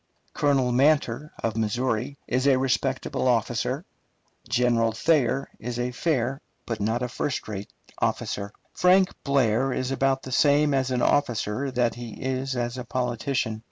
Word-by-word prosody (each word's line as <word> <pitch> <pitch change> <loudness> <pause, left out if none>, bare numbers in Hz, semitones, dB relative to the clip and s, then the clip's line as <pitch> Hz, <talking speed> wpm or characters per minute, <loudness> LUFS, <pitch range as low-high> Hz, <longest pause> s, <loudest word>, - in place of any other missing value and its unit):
Colonel 135 -4 +2
Manter, 140 +1 +2
of 115 -2 0
Missouri, 120 +4 -1
is 130 +2 +1
a 135 -2 +5
respectable 130 -1 0
officer. - - 0 0.6
General 120 -2 +2
Thayer 135 0 +2
is 120 0 -4
a 120 +1 -1
fair 135 -2 -1 0.2
but 115 -2 -3
not 115 +4 0
first 135 - -3
rate 100 -1 -6 0.3
officer. 100 0 -1 0.2
Frank 185 +1 +4
Blair 135 -2 +2
is 130 +1 -2
about 135 0 +1
the 130 - -7
same 145 +2 +4
as 135 -1 +1
an 125 -1 0
officer 130 -1 +1
that 120 -2 +1
he 120 -2 -8
is 130 0 -2
as 120 +1 -2
a - - -4
politician. 125 -2 -2
125 Hz, 145 wpm, -25 LUFS, 120-135 Hz, 0.6 s, a